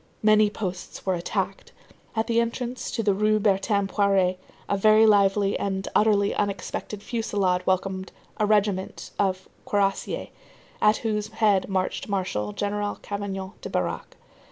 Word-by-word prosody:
Many 215 0 +5
posts 185 -3 -6
were 190 - +2
attacked. 170 -1 -3 0.4
At 220 0 +1
the 230 0 +2
entrance 240 +1 -3
to 225 - -2
the 205 -1 +3
Rue 215 +2 +2
Bertin 200 0 +2
Poirée, 195 -2 +2 0.3
a 200 - +1
very 215 +2 +5
lively 200 -1 +3
and 190 -1 -2
utterly 205 -2 +3
unexpected 205 0 -3
fusillade 200 -6 0
welcomed 190 0 -1 0.3
a 210 - +1
regiment 205 -3 0
of 190 -1 0 0.2
cuirrassiers, 195 -1 0 0.5
at 210 +1 +5
whose 210 -1 0
head 215 -3 +2
marched 190 +2 -2
Marshal 185 - -1
General 205 - -2
Cavaignac 195 -2 -5
de - - -6
Barague. - - -3
200 Hz, 135 wpm, -25 LUFS, 190-215 Hz, 0.5 s, Many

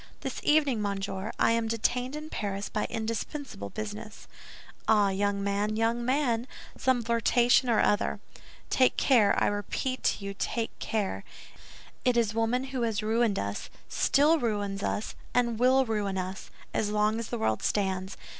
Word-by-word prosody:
"This - - -4
evening, 290 -7 +3
monsieur, 200 0 -3
I - - +3
am 230 0 +1
detained 245 +4 0
in 305 +1 -7
Paris 200 -1 -3
by 210 - -1
indispensable 225 - -4
business." 215 - -7 0.6
"Ah, 210 -2 +4
young 200 +1 0
man, 200 +2 0
young 230 +2 +1
man, 250 -2 +1 0.3
some 255 -2 +1
flirtation 235 +2 +3
or 225 - +3
other. 205 - +2 0.5
Take 255 -1 +3
care, 230 -7 +4
I - - +2
repeat 205 +6 -2
to 200 - +1
you, 200 - -4
take 225 +3 -3
care. 195 - -2 0.8
It 250 -1 +3
is 225 -3 +2
woman 230 +3 +1
who 255 - -1
has 220 -2 0
ruined 220 -1 +2
us, 100 +1 -3 0.2
still 305 +3 +3
ruins 205 -5 -1
us, 210 - -2 0.2
and 235 -2 +2
will 260 +2 +4
ruin 205 -4 -1
us, 185 +1 -5 0.2
as 210 - 0
long 210 +1 +1
as 230 - -4
the 240 - -3
world 110 - 0
stands. 190 -2 -1
220 Hz, 155 wpm, -28 LUFS, 205-240 Hz, 0.8 s, Ah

